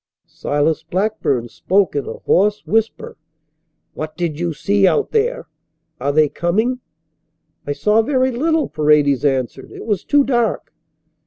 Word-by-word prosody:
Silas 145 +2 -1
Blackburn 185 - -1
spoke 185 - 0
in 140 - -2
a - - -4
hoarse 205 +2 +1
whisper: 225 0 -1 0.8
"What 155 0 -6
did 165 -4 -3
you 175 -1 -1
see 195 +6 +2
out 430 - +1
there? 485 +3 0 0.5
Are 140 +3 0
they 155 +1 +4
coming?" 215 - -1 0.9
"I 145 - 0
saw 210 +8 +2
very 260 +2 +1
little," 315 +5 0
Paredes 150 -3 +2
answered. 130 -2 -1
"It - - -9
was 210 -5 -1
too 290 -1 +3
dark." 240 -5 -1
190 Hz, 140 wpm, -19 LUFS, 150-235 Hz, 0.9 s, they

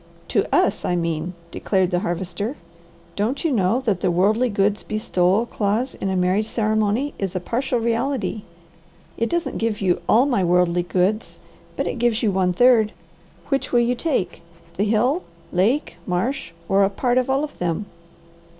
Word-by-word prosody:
"To - - +2
us, - - +2
I 180 - 0
mean," 170 0 -2 0.2
declared 190 -2 0
the 175 - +1
Harvester. 185 - -3 0.6
"Don't 225 - -1
you 325 - +2
know 225 +1 +2
that 210 -8 -1
the - - +2
'worldly 210 +8 +2
goods 205 0 +1
bestowal' 205 0 +1
clause 225 +4 -1
in 195 - -3
a 190 - -1
marriage 185 +4 +1
ceremony 220 +5 0
is 195 -2 -3
a - - +1
partial 245 +7 -1
reality. 235 0 -1 0.7
It 230 - -1
doesn't 345 0 -2
give 225 -2 -1
you 185 -3 +1
'all 240 +4 +5
my 245 -9 +1
worldly 175 0 +3
goods,' 185 +5 -1 0.4
but - - -1
it - - -3
gives 235 -1 +1
you 215 - +3
one 185 -1 +1
third. 225 +1 +4 0.6
Which 275 -1 -1
will 240 - +4
you 240 +1 +2
take, 250 - -2 0.3
the 200 - +1
hill, 240 - +2 0.3
lake, 220 - +1
marsh, 225 +7 -1 0.2
or 195 +1 +4
a 195 - +3
part 245 +5 +1
of 255 - -2
all 270 +2 +2
of 300 - -7
them." 175 +3 -1
215 Hz, 170 wpm, -22 LUFS, 185-245 Hz, 0.7 s, all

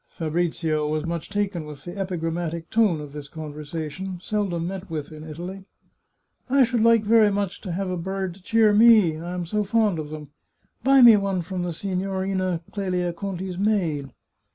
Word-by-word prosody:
Fabrizio 160 -2 -1
was 155 +1 -1
much 170 -1 -4
taken 200 -4 -1
with 150 -2 -10
the 175 +1 -7
epigrammatic 170 -3 -3
tone 215 -8 +3
of 145 -1 -9
this 145 -1 -7
conversation, 155 +4 -6
seldom 185 -4 -2
met 190 +1 -6
with 155 -2 -5
in 155 0 -9
Italy. 175 +5 -7 0.4
" - - -45
I 270 +1 +5
should 240 -1 +1 0.2
very 220 -1 +5
much 200 -2 -2
like - - -26
to 185 - -3
have 190 +1 -2
a 180 - -2
bird 190 +1 -3
to 190 - -17
cheer 220 +2 +3
me, 210 -7 +6
I 175 +2 -5
am 180 -1 -3
so 210 +5 0
fond 210 -4 +1
of 150 -1 -5
them. 155 -1 -7 0.6
Buy 270 -1 +6
me 230 -3 +9
one 195 -3 -1
from 185 +1 -4
the 175 0 -2
Signorina 190 0 -2
Clelia 180 -3 -1
Conti's 185 0 -5
maid." 175 -10 0
180 Hz, 180 wpm, -24 LUFS, 160-200 Hz, 0.6 s, me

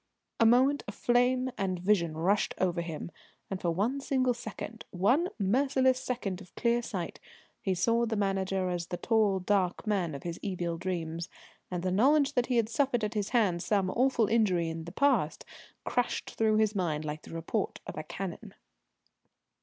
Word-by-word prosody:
A 230 - +6
moment 260 +5 +4
of 205 - -6
flame 250 +1 +2
and 185 -2 0
vision 175 -4 +1
rushed 195 +5 +1
over 175 -2 0
him, 165 0 -6 0.4
and 190 - -3
for 175 - 0
one 220 +11 0
single 260 -2 +1
second 225 -1 -7
one 245 - +2
merciless 260 +5 +2
second 225 -8 -3
of 175 - -15
clear 235 0 +2
sight 185 -7 -5 0.4
he 190 -2 0
saw 230 +6 +2
the 225 - -1
Manager 195 -2 0
as 175 -1 -3
the 175 - -4
tall 215 -3 +2
dark 185 0 0
man 185 -8 0
of 140 - -8
his 170 -1 -5
evil 175 -4 -3
dreams, 170 -2 -3 0.4
and 180 -1 -3
the 185 - 0
knowledge 280 +8 +4
that 245 -3 +1
he 250 - 0
had 230 -2 +3
suffered 245 0 +1
at 210 +1 -1
his 210 -2 -1
hands 200 -9 +2
some 195 -3 +1
awful 250 -2 +2
injury 195 -7 +2
in 160 0 -5
the 170 - -7
past 225 - +1 0.4
crashed 245 - -1
through 220 -1 +2
his 215 -1 +3
mind 160 -6 -1
like 150 0 -4
the - - -13
report 165 0 -2
of - - -7
a - - -3
cannon. - - -7
200 Hz, 180 wpm, -30 LUFS, 175-240 Hz, 0.4 s, A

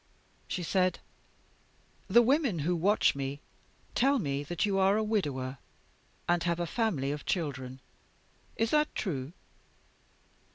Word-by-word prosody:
"She 180 - -3
said: 185 +1 +1 1.1
'The 240 - +6
women 260 - +2
who 175 +1 +2
watch 195 +6 +3
me 140 +1 -4 0.5
tell 275 +3 +3
me 140 - -1
that 170 +5 -1
you 195 -2 +1
are 195 +2 +4
a 220 - +1
widower, 140 - -1 0.7
and 175 0 +2
have 170 0 0
a 175 - 0
family 170 - 0
of 145 0 -4
children. 130 -7 -3 0.8
Is 225 0 0
that 300 0 +2
true? 145 -6 -3
175 Hz, 130 wpm, -30 LUFS, 140-215 Hz, 1.1 s, The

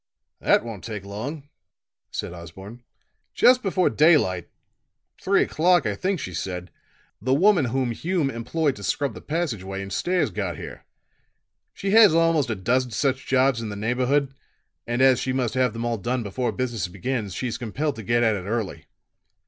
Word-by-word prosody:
"That - - +3
won't 110 -5 -7
take 105 -4 -6
long," 135 +9 -6 0.6
said - - -5
Osborne. 95 +7 -10 0.5
"Just 255 0 +5
before 185 -4 +1
daylight 145 - +3 0.7
three 195 +1 +3
o'clock, 175 -2 +2
I 105 - 0
think 185 - -1
she 90 -9 -6
said 90 +1 -5 0.5
the 130 +4 +2
woman 180 -1 +4
whom 125 0 -1
Hume 160 +2 -1
employed 140 +5 -1
to 100 - -9
scrub 135 +6 -1
the - - -10
passage 150 - -2
way 95 +1 -5
and 100 0 -6
stairs 180 - 0
got - - -3
here. - - -9 0.9
She 195 - -2
has 215 -5 +7
almost 165 -5 +3
a 110 - -1
dozen 125 +6 0
such 130 +4 -1
jobs 130 -2 +2
in 110 - -4
the 105 - -5
neighborhood, 130 +6 0 0.5
and 120 +2 +1
as 130 -2 +5
she 130 - -2
must 125 -4 -1
have 130 -2 +2
them 115 +2 -4
all 120 -2 -1
done 120 +3 -2
before 120 +5 -2
business 120 -6 -2
begins, 100 +2 -3
she's 125 -3 -3
compelled 135 +5 -2
to - - -5
get 120 +3 +1
at 110 -2 +3
it 90 -2 -6
early. 110 -2 -3
125 Hz, 175 wpm, -24 LUFS, 105-145 Hz, 0.9 s, has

